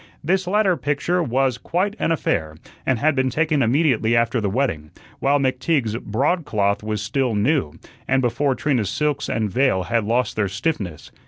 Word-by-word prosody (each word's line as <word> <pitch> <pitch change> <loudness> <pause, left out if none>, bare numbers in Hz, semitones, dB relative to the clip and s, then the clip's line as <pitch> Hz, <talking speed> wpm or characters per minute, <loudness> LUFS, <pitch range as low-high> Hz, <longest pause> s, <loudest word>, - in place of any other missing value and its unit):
This 185 +4 0
latter 195 -1 +2
picture 155 +5 0
was 130 -3 0
quite 195 - -1
an - - 0
affair, 80 - -1 0.3
and 130 - +2
had 155 +7 +2
been 130 -1 +1
taken 155 +1 +1
immediately 120 -3 +2
after 115 0 +1
the 100 - 0
wedding, 95 - -1 0.3
while 140 +1 +3
McTeague's 130 -3 0
broadcloth 110 - 0
was 105 -1 -3
still 120 +2 0
new, 105 - +1 0.3
and 135 0 +2
before 130 +2 +1
Trina's 125 -9 0
silks 150 -2 -1
and 110 -3 -1
veil 110 -5 +2
had 115 +5 0
lost 120 +2 0
their 105 -2 0
stiffness. 100 - -3
130 Hz, 165 wpm, -22 LUFS, 110-150 Hz, 0.3 s, while